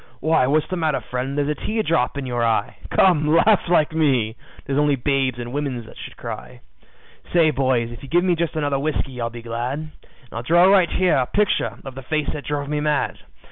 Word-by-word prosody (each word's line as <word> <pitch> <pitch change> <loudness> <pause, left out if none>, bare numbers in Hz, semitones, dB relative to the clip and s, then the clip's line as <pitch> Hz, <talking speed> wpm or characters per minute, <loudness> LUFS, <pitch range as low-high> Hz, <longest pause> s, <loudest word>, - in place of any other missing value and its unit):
Why, 155 -2 +2
what's 150 +3 +2
the 185 - -2
matter, 155 -5 0
friend? 130 +3 -3
There's 145 -1 +1
a - - +1
tear 220 0 0
drop 150 -7 0
in 140 - -3
you 125 -1 -4
eye, 115 -3 0 0.2
Come, 160 -6 +4
laugh 205 +3 +5
like 160 -4 +3
me. 130 -9 +1 0.3
'Tis 135 - -2
only 145 -1 +3
babes 135 -1 0
and 120 0 -6
women 140 -4 -2
that - - -14
should - - -10
cry. - - -8 0.7
"Say, 165 -3 +4
boys, 130 -4 0
if 120 - -10
you 140 - -10
give 175 +4 +3
me 185 -1 +2
just 170 -1 -2
another 145 -3 0
whiskey 135 -4 -3
I'll 115 - -1
be 120 0 -10
glad, 120 +4 -3
And 155 0 -7 0.4
I'll 115 - -4
draw 170 +8 +4
right 190 -2 +5
here 185 -5 +2
a 130 -2 +1
picture 210 -1 0
of 135 - -7
the 135 - -8
face 150 +2 -2
that 150 - -6
drove 145 -1 -3
me 150 0 -1
mad. 150 -1 -1
145 Hz, 220 wpm, -22 LUFS, 125-160 Hz, 0.7 s, laugh